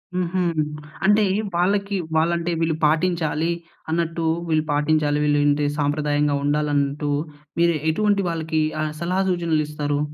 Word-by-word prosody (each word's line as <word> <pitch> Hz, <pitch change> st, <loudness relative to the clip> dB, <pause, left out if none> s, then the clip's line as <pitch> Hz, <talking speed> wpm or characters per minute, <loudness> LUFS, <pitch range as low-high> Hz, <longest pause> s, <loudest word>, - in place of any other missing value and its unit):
హుహు. 180 Hz, 0 st, 0 dB, 0.6 s
అంటే 210 Hz, +2 st, +5 dB, 0.3 s
వాళ్ళకి 200 Hz, +3 st, +1 dB, 0.2 s
వాళ్లంటే 170 Hz, +2 st, +1 dB
వీళ్ళు 160 Hz, -1 st, +1 dB
పాటించాలి 165 Hz, 0 st, +1 dB, 0.4 s
అన్నట్టు 165 Hz, 0 st, -1 dB, 0.2 s
వీళ్ళు 155 Hz, -1 st, +2 dB
పాటించాలి, 150 Hz, 0 st, +1 dB
విలుంటే 145 Hz, 0 st, +2 dB
సాంప్రదాయంగా 145 Hz, 0 st, +1 dB
ఉండాలన్నట్టు. 145 Hz, 0 st, 0 dB, 0.5 s
మీరు 170 Hz, -1 st, +4 dB
ఎటువంటి 205 Hz, +3 st, +2 dB
వాళ్ళకి 160 Hz, -1 st, -1 dB, 0.2 s
ఆహ్, 155 Hz, 0 st, -1 dB
సలహా 180 Hz, +3 st, 0 dB
సూచనలిస్తారు? 150 Hz, -4 st, 0 dB
160 Hz, 105 wpm, -22 LUFS, 150-170 Hz, 0.6 s, అంటే